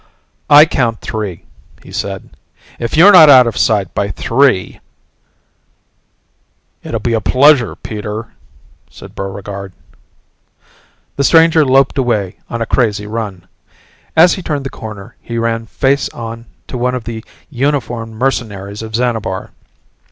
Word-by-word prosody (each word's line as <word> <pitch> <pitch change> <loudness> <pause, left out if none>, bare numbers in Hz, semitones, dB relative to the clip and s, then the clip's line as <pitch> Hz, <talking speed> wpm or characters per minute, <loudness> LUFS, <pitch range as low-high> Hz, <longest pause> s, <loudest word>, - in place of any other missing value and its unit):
"I 150 +1 +8
count 120 -7 -1
three," 105 -6 -5 0.4
he - - -14
said. - - -5 0.5
"If 120 +6 -3
you're 185 +6 +8
not 160 -6 +8
out 130 -3 +8
of 115 -3 -2
sight 100 -5 0
by 100 0 -1
three 115 0 0 0.9
" - - -46
"It'll 115 - -4
be 115 +2 -2
a 110 - 0
pleasure, 135 0 +3
Peter," 110 +1 -6 0.6
said - - -13
Buregarde. 100 0 -7 1.4
The 140 - +1
stranger 165 +1 +5
loped 135 0 +2
away 105 -7 -1
on 115 0 -3
a - - -4
crazy 105 -4 0
run. 105 -4 -6 0.7
As 170 +2 +6
he 190 - -5
turned 145 -5 -3
the 135 - -5
corner 105 -3 -10
he 115 - -6
ran 115 0 -2
face 135 +5 0
on 115 0 -8 0.2
to 125 - -6
one 125 +1 0
of 125 - -5
the 110 -1 -7 0.3
uniformed 120 -4 -2
mercenaries 105 -5 -3
of 110 -1 -6
Xanabar. 110 -6 -2
115 Hz, 135 wpm, -15 LUFS, 105-135 Hz, 1.4 s, I